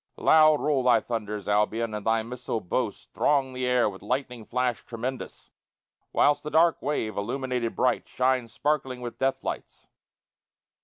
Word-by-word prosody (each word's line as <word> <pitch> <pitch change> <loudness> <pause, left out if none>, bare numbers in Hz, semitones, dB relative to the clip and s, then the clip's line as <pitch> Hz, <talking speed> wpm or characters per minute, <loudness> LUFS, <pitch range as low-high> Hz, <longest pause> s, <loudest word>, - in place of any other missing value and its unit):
Loud 155 -1 +5
roll 145 -3 +1
thy 125 -2 +4
thunders, 105 -3 -4
Albion; 105 +2 +1
and 105 -1 -4
thy 110 +1 +1
missile 120 0 -4
Boasts 110 +3 -3
throng 135 -3 +1
the 130 0 -2
air 125 -2 +3
with 95 -2 -6
lightning 125 -3 -3
flash 125 0 -1
tremendous, 125 +2 -6 0.6
Whilst 145 0 +3
the 150 - -5
dark 165 +2 +3
wave, 125 -7 -2
illuminated 125 +2 -2
bright, 130 - +1
shines 130 -2 0
Sparkling 135 -3 -1
with 120 -1 -7
death 135 0 0
lights. - - -6
125 Hz, 150 wpm, -26 LUFS, 115-135 Hz, 0.6 s, Loud